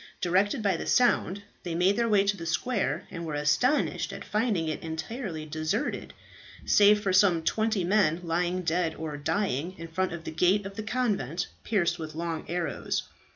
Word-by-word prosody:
Directed 200 +7 +1
by 195 -4 +2
the - - -5
sound, 205 -5 +2 0.2
they 170 -2 -4
made 185 +4 +3
their 235 +1 +1
way 205 -2 +4
to 200 0 +1
the 165 -3 -7
square, 220 +6 -1
and 170 -2 -6
were 155 -3 -4
astonished 150 - +1
at - - -8
finding 210 -7 0
it 155 - -3
entirely 165 +1 -5
deserted, 155 - -2 0.5
save 210 0 +6
for 195 -3 0
some 185 -4 +4
twenty 215 +1 +1
men, 180 -3 +2
lying 175 +2 -1
dead 165 -1 0
or 155 -2 -5
dying 170 +2 -1
in 165 - -7
front 185 +3 -1
of 170 -1 -6
the - - -5
gate 185 +5 +2
of 195 0 -7
the 215 - -4
convent, 210 - -1
pierced 195 -7 +1
with 155 -1 -6
long 165 -1 -3
arrows. 175 0 -2
180 Hz, 180 wpm, -28 LUFS, 165-205 Hz, 0.5 s, save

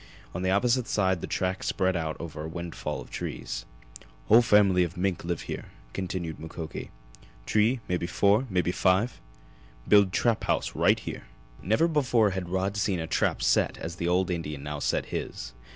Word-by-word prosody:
On 90 - -4
the 95 - 0
opposite 120 +5 +2
side 95 -4 +1
the - - -4
tracks 95 0 -2
spread 95 -1 +1
out 80 -2 -2
over 80 -2 -6
a - - -4
windfall 85 0 -5
of - - -13
trees. - - -5 0.6
"Whole 115 +3 +8
family 100 -6 +4
mink 90 -1 -1
live 85 -1 -2
here," - - -6 0.3
continued 90 -4 -4
Mukoki. 80 0 -7 0.6
"T'ree 115 +4 +2
mebby 90 -1 -1
four 105 +7 +3
mebby 90 -3 +1
five. 95 +6 +1 0.7
Build 100 -2 +6
trap 115 +4 +1
house - - 0
right - - +4
here!" - - -7 0.4
Never 110 - +2
before 125 -9 +2
had 95 -2 -4
Rod 95 +2 -1
seen 95 -2 0
a 80 - -2
trap 80 - 0
set - - +2
as 85 +1 -6
the 85 - -2
old 90 +1 +2
Indian 75 -5 -4
now 75 0 -4
set - - 0
his. - - -5
95 Hz, 170 wpm, -27 LUFS, 85-105 Hz, 0.7 s, Whole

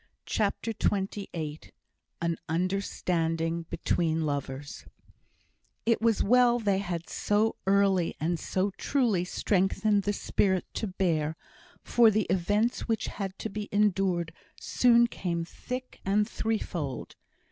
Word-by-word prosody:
CHAPTER 215 +2 -1
XXVIII 190 -7 -2 0.6
An 170 0 +1
Understanding 165 -2 -1
Between 160 -2 0
Lovers 145 0 -4 1.0
It 230 -1 +2
was 225 -2 +3
well 245 +1 +5
they 200 -4 +1
had 175 -4 -4
so 210 +2 +1
early 195 -3 +3
and 165 +2 0
so 190 +5 -1
truly 235 -10 +1
strengthened 200 +3 +1
the 205 - 0
spirit 190 -2 +1
to 220 - -2
bear, 165 -5 0 0.5
for 235 -2 +5
the 215 -2 +1
events 205 +6 +1
which 225 -2 -1
had 195 -1 -3
to 220 - -4
be 210 0 -5
endured 190 -5 +1 0.3
soon 235 -1 +4
came 170 -7 -3
thick 255 +8 -7
and 205 +2 +2
threefold. 180 - -3
195 Hz, 115 wpm, -28 LUFS, 170-215 Hz, 1.0 s, well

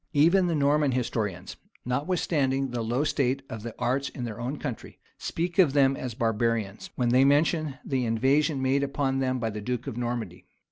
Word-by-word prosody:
Even 170 +5 +4
the 170 - 0
Norman 145 -1 +2
historians, 105 -7 -3 0.3
notwithstanding 135 -1 0
the 120 -1 -2
low 120 +5 0
state 135 -2 0
of 110 - -5
the 115 0 -7
arts 130 +3 0
in 125 - -7
their 115 -2 -5
own 130 +5 -3
country, 125 - -6 0.2
speak 175 +2 -3
of 160 -8 +5
them 135 -1 +4
as 125 -4 -5
barbarians, 115 -3 -1
when 125 -2 +1
they 130 +2 +5
mention 150 +1 +2
the 130 -2 0
invasion 135 +5 +2
made 135 +2 +2
upon 135 -1 -1
them 130 -1 0
by 115 -2 -2
the 105 0 -6
duke 125 +2 -3
of 115 - -5
Normandy. 120 -7 -4
130 Hz, 185 wpm, -27 LUFS, 120-140 Hz, 0.3 s, of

